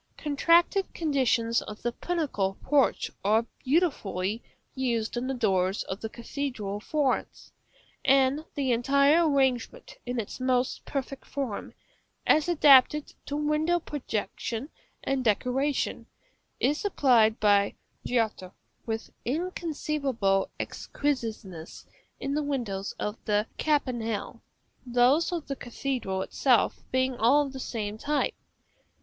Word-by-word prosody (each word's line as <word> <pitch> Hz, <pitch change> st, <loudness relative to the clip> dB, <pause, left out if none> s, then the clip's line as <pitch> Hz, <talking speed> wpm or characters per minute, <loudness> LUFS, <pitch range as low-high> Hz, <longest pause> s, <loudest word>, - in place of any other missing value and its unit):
Contracted 335 Hz, +6 st, +3 dB
conditions 250 Hz, -7 st, +1 dB
of 210 Hz, 0 st, -9 dB
the 240 Hz, -, 0 dB
pinnacle 250 Hz, -, -2 dB
porch 285 Hz, -1 st, +2 dB
are 220 Hz, +3 st, +3 dB, 0.2 s
beautifully 230 Hz, -, 0 dB, 0.3 s
used 235 Hz, -4 st, -1 dB
in 245 Hz, +1 st, -2 dB
the 270 Hz, -, -1 dB
doors 195 Hz, -4 st, +1 dB
of 190 Hz, -, -6 dB
the 220 Hz, -, -4 dB
cathedral 235 Hz, -4 st, -4 dB
of 210 Hz, -, -11 dB
Florence; 290 Hz, -4 st, -1 dB, 0.5 s
and 275 Hz, +2 st, +3 dB
the 275 Hz, -4 st, 0 dB
entire 280 Hz, +7 st, +4 dB
arrangement, 270 Hz, -, 0 dB
in 245 Hz, 0 st, -2 dB
its 215 Hz, -, -5 dB
most 255 Hz, 0 st, 0 dB
perfect 275 Hz, -1 st, -4 dB
form, 265 Hz, -8 st, -5 dB, 0.5 s
as 310 Hz, +2 st, +4 dB
adapted 295 Hz, -2 st, +5 dB
to 285 Hz, -, -3 dB
window 305 Hz, +3 st, +1 dB
protection 245 Hz, -, -4 dB, 0.3 s
and 270 Hz, -1 st, 0 dB
decoration, 250 Hz, +6 st, 0 dB, 0.5 s
is 295 Hz, +2 st, +1 dB
applied 245 Hz, -, +3 dB
by 205 Hz, -1 st, +3 dB, 0.3 s
Giotto 220 Hz, -6 st, -1 dB, 0.3 s
with 225 Hz, 0 st, -3 dB
inconceivable 285 Hz, -, -1 dB
exquisiteness 220 Hz, -, -4 dB, 0.3 s
in 275 Hz, -, -2 dB
the 300 Hz, -, +1 dB
windows 235 Hz, -9 st, -3 dB
of 210 Hz, +2 st, -4 dB
the 210 Hz, -1 st, +2 dB
campanile; 240 Hz, -8 st, -1 dB, 0.4 s
those 250 Hz, +7 st, +3 dB
of 340 Hz, -4 st, -3 dB
the 275 Hz, -, -4 dB
cathedral 240 Hz, -6 st, -3 dB
itself 250 Hz, +1 st, +2 dB
being 260 Hz, 0 st, +1 dB
all 275 Hz, +6 st, +4 dB
of 275 Hz, -, -8 dB
the 265 Hz, -, -6 dB
same 215 Hz, -4 st, -4 dB
type. 295 Hz, +3 st, 0 dB
255 Hz, 120 wpm, -28 LUFS, 220-290 Hz, 0.5 s, adapted